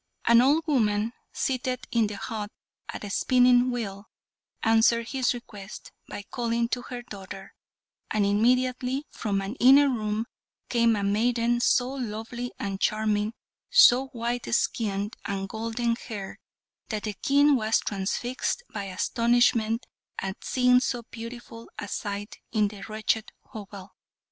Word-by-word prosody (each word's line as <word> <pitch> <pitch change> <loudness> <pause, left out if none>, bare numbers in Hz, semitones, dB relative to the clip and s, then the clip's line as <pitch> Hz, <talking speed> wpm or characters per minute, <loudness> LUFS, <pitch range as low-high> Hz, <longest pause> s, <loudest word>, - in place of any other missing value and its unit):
An 235 0 +7
old 295 +5 +3
woman, 220 -6 +1 0.2
seated 255 -1 -2
in 230 -3 +3
the 205 -1 -6
hut 210 0 -5 0.4
at - - -6
a 205 - -5
spinning 250 +2 +4
wheel, 215 -4 -5 0.5
answered 225 +1 +3
his 265 -2 +1
request 210 -4 -10 0.2
by 205 - -6
calling 235 +1 -1
to 245 - -1
her 245 0 -7
daughter, 195 -3 -9 0.6
and 210 -2 +1
immediately 250 +6 +1
from 200 -3 -2
an 195 +2 -4
inner 275 +3 +7
room 215 -2 -1 0.4
came 235 -2 +3
a 200 - -2
maiden 230 +3 +1
so 245 +1 +3
lovely 240 -1 -5
and 195 -1 -4
charming, 215 0 +1 0.3
so 270 - +7
white 240 -1 -3
skinned 205 -3 -1
and 195 -1 -3
golden 230 +2 -1
haired, 210 -5 -7 0.5
that 215 -2 -3
the 215 - -3
King 285 +7 +4
was 220 -2 +2
transfixed 240 - -2
by 205 -2 -4
astonishment 230 +3 +2 0.3
at 190 0 -5
seeing 250 -1 +4
so 245 -2 -2
beautiful 230 0 -9
a 205 - -5
sight 205 +1 -5
in 210 -2 +2
the 200 -1 -11
wretched 215 0 -1 0.2
hovel. 200 -2 -9
230 Hz, 135 wpm, -27 LUFS, 210-245 Hz, 0.6 s, An